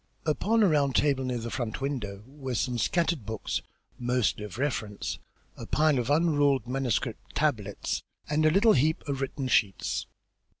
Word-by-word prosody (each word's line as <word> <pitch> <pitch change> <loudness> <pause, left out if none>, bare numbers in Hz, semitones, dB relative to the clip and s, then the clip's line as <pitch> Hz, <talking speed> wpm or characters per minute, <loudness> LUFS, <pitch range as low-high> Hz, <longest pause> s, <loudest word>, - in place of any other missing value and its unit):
Upon 210 +9 +2
a - - +6
round 145 -5 +2
table 140 -3 +3
near 125 -1 -1
the 115 0 -5
front 120 -4 -3
window 115 -8 -3
were 135 -1 -6
some 120 +1 0
scattered 170 -1 +1
books, 110 0 -3 0.4
mostly 120 -3 +1
of 105 -1 -7
reference, 115 -7 -2 0.4
a - - -8
pile 150 -3 +3
of 120 +1 -2
unruled 145 -4 +3
manuscript 125 -2 -2
tablets, - - -1 0.3
and 150 +1 +1
a 155 - +6
little 205 +7 +5
heap 155 +4 +1
of 140 -1 -2
written 135 0 -2
sheets. 100 -6 +1
135 Hz, 160 wpm, -28 LUFS, 120-150 Hz, 0.4 s, a